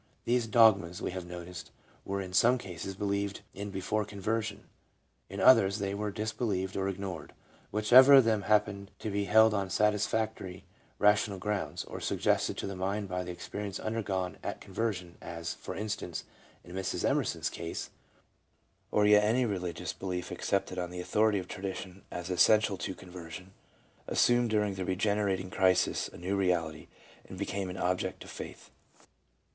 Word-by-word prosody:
These 120 -1 +1
dogmas, 100 -6 +4
we - - -3
have 90 -1 -6
noticed, 90 0 -8 0.4
were 100 0 -2
in 90 -1 -9
some 120 +7 +5
cases 95 -3 -6
believed 100 0 -2
in 100 +2 -5
before 100 +2 -1
conversion; 105 +1 -3 0.7
in - - -6
others, 100 +1 +6
they 100 -1 -2
were 105 +1 -2
disbelieved 105 -3 -2
or 95 0 0
ignored. 95 -5 -6 0.4
Whichever 125 +7 +7
of 135 - +9
them 110 -2 +2
happened 100 -1 +1
to 110 - -4
be 100 0 0
held 110 +2 +6
on 100 -2 -1
satis 105 +1 +2
factory 110 -5 -3 0.3
rational 105 -1 +3
grounds, 105 +2 -2
or - - -7
suggested - - 0
to - - -3
the 100 - -4
mind 100 +2 -2
by 90 0 -2
the 90 - -8
experience 100 +3 -5
undergone 100 -5 -2
at - - -4
conversion, 95 -4 -4
as, 85 -1 -5
for - - -7
instance, 105 +1 -4 0.4
in 90 +1 -10
Mrs. 95 0 -1
Emerson's - - 0
case, 85 - -5 1.0
or 105 - +3
yet 105 0 +6
any 120 +4 +3
religious 90 -5 -3
belief 90 -2 -4
accepted 95 - -1
on 90 -1 -3
the 90 0 -7
authority 105 +3 +2
of 90 -2 -4
tradition 95 0 -6
as 90 +1 -5
essential 105 +3 +4
to 95 0 -4
conversion, 90 +1 -10 0.5
assumed 120 -1 +3
dur 105 -1 +2
ing 100 -1 -1
the 95 -1 -4
regenerating 95 0 0
crisis 95 -1 +2
a - - -13
new 95 +3 -2
reality, 85 -5 0 0.4
and - - -8
became 95 -1 -3
an 90 - -6
object 90 +1 -1
of - - -11
Faith. - - -9
100 Hz, 160 wpm, -30 LUFS, 90-105 Hz, 1.0 s, of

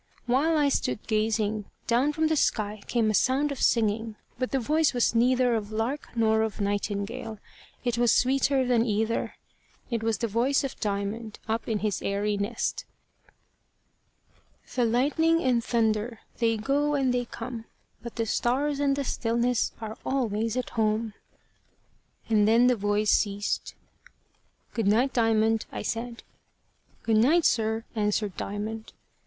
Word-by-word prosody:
While 285 +7 +2
I 290 -1 +3
stood 240 - -1
gazing, 215 -1 0 0.2
down 250 +5 +2
from 315 +1 0
the 315 0 +2
sky 215 -7 0
came 225 -3 +1
a - - -2
sound 265 +8 +2
of 275 - -5
singing, 225 -1 +1 0.2
but 255 - -1
the 270 - 0
voice 305 +3 +1
was 245 - +2
neither 245 +1 +3
of 215 -2 -2
lark 230 +7 -2
nor 220 -1 +3
of 220 -2 -2
nightingale: 205 +3 -3 0.5
it 240 -2 -1
was 240 -1 +4
sweeter 265 +1 +2
than 245 -2 +3
either: 220 0 -1 0.6
it 230 -2 -1
was 225 -1 0
the 230 - -1
voice 240 +7 +1
of 270 - -5
Diamond, 210 +2 -3
up 225 +1 -2
in 220 - +1
his 210 - -1
airy 205 +1 -1
nest: 205 +3 -2 1.9
The 245 - +2
lightning 300 +8 +2
and 245 -3 +2
thunder, 225 0 0 0.2
They 225 -1 +2
go 285 +6 +1
and 265 -3 +1
they 245 0 0
come; 230 -1 -7 0.4
But 235 - -8
the 230 - -1
stars 275 +6 0
and 280 -1 +2
the 280 - -2
stillness 240 -1 0
Are 220 0 -7
always 230 -3 -1
at 255 - -3
home. 220 0 0 1.1
And 210 -2 +3
then 230 +3 +5
the 250 0 +4
voice 205 0 +1
ceased. 205 -1 0 1.0
"Good 225 -4 -1
night, 240 +6 +3
Diamond," 225 -1 +2
I - - -5
said. 230 +2 -4 0.8
"Good 225 -1 +2
night, 305 +10 +4
sir," 220 0 +1
answered 210 -2 -1
Diamond. 215 +2 -5
230 Hz, 150 wpm, -27 LUFS, 215-255 Hz, 1.9 s, then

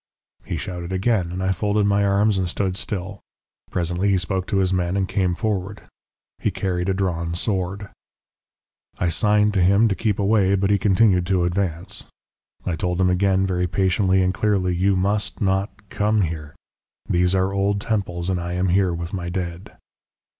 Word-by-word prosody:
"He - - -4
shouted 90 -1 -5
again, 95 -2 0
and 90 +1 -4
I 95 - +1
folded 105 +2 +1
my 100 0 +2
arms 100 0 +2
and 90 -2 -1
stood 95 0 -1
still. 95 0 -4 0.5
Presently 90 +3 -1
he 95 - +3
spoke 95 0 -2
to 100 - 0
his 95 -1 +2
men 90 +1 0
and 95 -1 0
came 90 -3 0
forward. 100 -1 -3 0.6
He - - 0
carried 90 -1 -2
a - - +2
drawn 85 -3 -2
sword. 95 +1 -2 1.1
"I 90 - 0
signed 105 +3 +2
to 95 - +2
him 100 +5 +4
to - - +1
keep 105 0 -1
away, 100 -1 +3
but 100 +1 +1
he 100 - +3
continued 95 -2 +3
to 95 -2 +2
advance. 90 +1 -2 0.6
I 90 - -1
told 90 +2 -2
him 90 -1 +3
again 95 +1 +2
very 90 -1 0
patiently 95 0 +2
and 90 0 +1
clearly: 95 -3 +1
'You 95 +2 +2
must 100 +3 -1
not 95 +1 +1 0.2
come 105 +1 +1
here. 80 -4 -4 0.5
These 90 +1 +2
are 95 +1 +1
old 100 +1 +1
temples 95 -5 -2
and 90 -2 -1
I 85 0 -4
am 90 +1 0
here 90 -1 +2
with 85 +2 -6
my 90 -2 -3
dead.' 90 +2 -5
95 Hz, 180 wpm, -22 LUFS, 90-100 Hz, 1.1 s, him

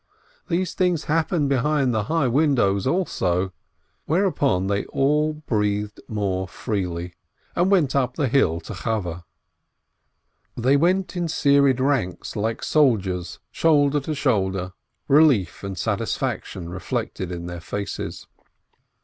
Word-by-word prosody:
These 180 +1 -1
things 180 -4 +1
happen 160 -1 +1
behind 140 -1 +1
the 110 -2 0
"high 160 -2 +1
windows" 120 -7 +2
also. 95 - 0 0.5
Whereupon 150 - +1
they 100 +1 -1
all 150 +3 +1
breathed 105 -7 -2
more 95 -3 -2
freely, 90 -5 -3 0.4
and 180 +2 +2
went 165 -10 +3
up 125 -2 +1
the 145 - 0
hill 110 -11 +2
to - - -8
Chaweh. 90 -7 -3 1.4
They 130 +4 +3
went 180 +6 +1
in 175 -1 -1
serried 140 -4 +3
ranks, 130 -10 -1
like 110 +2 -2
soldiers, 95 - +1
shoulder 145 -3 +3
to 150 +3 -4
shoulder, 95 -9 0 0.3
relief 135 - +4
and 100 -2 -5
satisfaction 85 +1 -2
reflected 90 0 -4
in 85 -1 -5
their 85 -1 -6
faces. 100 +5 -5
125 Hz, 120 wpm, -23 LUFS, 95-150 Hz, 1.4 s, relief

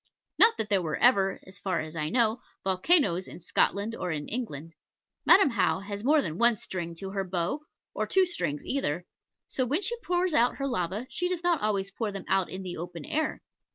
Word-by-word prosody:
Not 455 0 +6
that 210 - -2
there 200 -3 +3
were 155 -3 -2
ever 200 -6 +3
(as 190 +1 -12
far 185 -4 -1
as 155 +1 -6
I 155 -1 -2
know) 235 +1 +2 0.2
volcanos 190 - +3
in - - -10
Scotland 200 +5 +1
or 180 - -4
in 150 -3 -3
England. 165 - -5 0.5
Madam 360 -7 +7
How 205 -5 +2
has 200 +1 -6
more 295 +3 +4
than 160 0 -4
one 235 0 +5
string 170 -3 -5
to 190 +3 -6
her 195 -1 -1
bow, 180 - -2 0.3
or - - -2
two 380 -1 +4
strings 150 - -3
either; 175 - -1 0.4
so 260 - -1
when 290 - 0
she 475 - +2
pours 360 -5 0
out 245 -2 +3
her 275 - -3
lavas, 205 -2 -2
she 355 - -1
does 355 -2 -2
not 345 -3 +2
always 200 -2 0
pour 215 +1 -3
them 195 -2 -7
out 195 -2 +1
in 190 +1 -6
the 180 -1 -5
open 170 -1 -7
air. 310 +1 -2
200 Hz, 210 wpm, -28 LUFS, 180-270 Hz, 0.5 s, Madam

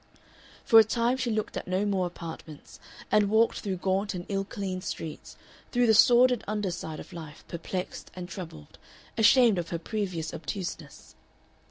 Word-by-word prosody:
For 225 - +8
a - - +9
time 235 +3 +1
she 255 -2 -1
looked 215 -1 -2
at - - -5
no 185 +3 0
more 190 -3 +1
apartments, 165 -3 -10 0.3
and 210 -1 +4
walked 220 +2 +3
through 195 -3 -3
gaunt 190 +2 -1
and 175 0 -5
ill 195 -1 0
cleaned 190 -2 -5
streets, 160 -2 -6 0.3
through 245 -1 +3
the 220 - +5
sordid 245 +2 +6
under 210 -2 -1
side 160 -2 -6
of - - -11
life, 155 -4 -9
perplexed 180 +2 -5
and 180 -1 -6
troubled, 165 - -9 0.4
ashamed 225 -2 +5
of 170 - -4
her 170 - -2
previous 175 -3 -3
obtuseness. 165 -4 -6
195 Hz, 165 wpm, -28 LUFS, 170-220 Hz, 0.4 s, a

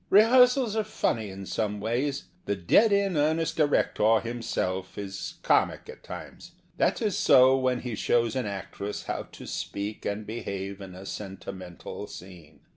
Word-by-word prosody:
Rehearsals 245 +2 +6
are 220 - +1
funny 115 - -1
in 95 0 -8
some 105 +1 -2
ways. 130 +6 -1 0.2
The 100 - 0
dead 100 - +4
in 200 -2 +2
earnest 160 +2 +1
director 115 -7 +3
himself 95 -5 -3
is 95 -1 -5
comic - - +2
at - - -11
times. - - -9 0.2
That - - +1
is 210 -4 +1
so 130 0 +6
when 130 -2 +1
he 125 -2 -4
shows 115 +3 +1
an 130 -4 -1
actress 100 +1 -5
how - - -4
to - - -10
speak 100 +1 -4
and 105 +1 -3
behave 100 -3 -5
in 95 -2 -9
a 95 +1 -10
sentimental 95 -3 -7
scene. 85 -4 -12
110 Hz, 155 wpm, -27 LUFS, 100-145 Hz, 0.2 s, Rehearsals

